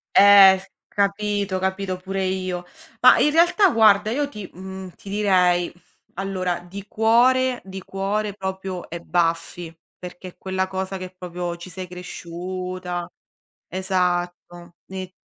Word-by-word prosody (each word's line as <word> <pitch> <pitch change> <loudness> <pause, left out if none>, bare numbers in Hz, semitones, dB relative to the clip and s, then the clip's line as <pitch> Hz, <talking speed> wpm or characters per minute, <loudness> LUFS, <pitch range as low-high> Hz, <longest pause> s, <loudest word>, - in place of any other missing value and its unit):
Eh, 195 -1 +9
s 195 +1 -14 0.2
capito, 200 -1 0
capito, 190 0 -2
pure 195 +1 -4
io. 185 -1 -3 0.3
Mah, - - +7
in 300 - +4
realtà 350 +5 +4
guarda 215 -3 +4
io 285 +4 0
ti 210 -8 -8
mhmm, 190 0 -8
ti 200 +3 -15
direi, 185 -4 +2 0.4
allora 185 -2 -2
di 190 +3 -10
cuore 245 +4 +3
di 190 0 -8
cuore 200 +2 -2
proprio 190 -2 -5
è 170 - -5
Buffy, 165 0 -1 0.2
perché 180 0 -9
è - - -14
quella 190 0 -2
cosa 190 0 -4
che 185 0 -8
proprio 175 -1 -5
ci 170 +2 -10
sei 185 +1 -7
cresciuta. 180 0 -6 0.6
Esatto, 175 -2 -2
e 185 -1 -6
190 Hz, 135 wpm, -23 LUFS, 180-200 Hz, 0.6 s, Eh